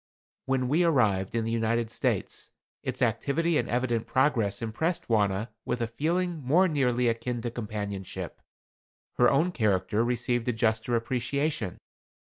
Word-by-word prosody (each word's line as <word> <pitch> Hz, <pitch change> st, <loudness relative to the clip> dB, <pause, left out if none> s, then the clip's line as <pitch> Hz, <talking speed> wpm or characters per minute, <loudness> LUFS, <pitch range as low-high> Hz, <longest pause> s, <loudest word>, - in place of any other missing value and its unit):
When 130 Hz, -1 st, +1 dB
we 155 Hz, +7 st, +3 dB
arrived 110 Hz, -, +2 dB
in 115 Hz, -1 st, 0 dB
the 115 Hz, -, -1 dB
United 115 Hz, 0 st, 0 dB
States, -, -, -2 dB, 0.3 s
its -, -, -2 dB
activity 140 Hz, +8 st, +1 dB
and -, -, -2 dB
evident 120 Hz, -2 st, 0 dB
progress 120 Hz, -7 st, +2 dB
impressed 140 Hz, +10 st, -2 dB
Wauna 105 Hz, -1 st, +1 dB
with 125 Hz, -, -2 dB
a 115 Hz, -, 0 dB
feeling 165 Hz, +8 st, -1 dB
more 170 Hz, +9 st, +4 dB
nearly 125 Hz, -6 st, +1 dB
akin 115 Hz, +1 st, -1 dB
to 120 Hz, -, -2 dB
companionship. 105 Hz, -4 st, -5 dB, 0.8 s
Her 120 Hz, -, +6 dB
own 160 Hz, +6 st, +2 dB
character 105 Hz, -, +1 dB
received 120 Hz, 0 st, 0 dB
a 125 Hz, -, +2 dB
juster 110 Hz, +1 st, +1 dB
appreciation. 125 Hz, -, -1 dB
120 Hz, 140 wpm, -28 LUFS, 110-140 Hz, 0.8 s, Her